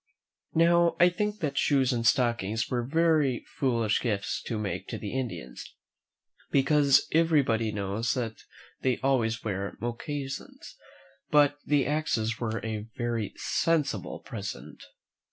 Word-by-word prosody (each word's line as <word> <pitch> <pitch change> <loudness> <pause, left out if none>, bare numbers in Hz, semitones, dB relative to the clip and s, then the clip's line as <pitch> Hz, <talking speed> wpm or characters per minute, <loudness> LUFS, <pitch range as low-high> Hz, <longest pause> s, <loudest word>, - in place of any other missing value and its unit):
Now, 170 +1 +4
I 175 - +7
think 210 +4 -2
that 140 -3 -1
shoes 135 -2 +3
and 115 -1 +1
stockings 115 -3 +1
were 125 -1 +1
very 150 -2 +2
foolish 115 -5 +1
gifts 105 -5 -1
to 115 - -2
make 105 -2 -3
to - - -4
the - - -6
Indians, 120 - -5 0.7
because 140 0 +4
everybody 140 -9 +2
knows 105 +3 -1
that 115 -4 -3 0.4
they 130 -2 +1
always 115 -5 +1
wear 100 -2 -3
mocassins; 135 +4 -5 0.5
but 145 -1 +4
the 145 -2 +3
axes 120 -7 -1
were 115 -1 -3
a 110 -1 -4
very 115 -3 -2
sensible 160 -4 0
present. 100 -7 -7
125 Hz, 125 wpm, -28 LUFS, 110-145 Hz, 0.7 s, I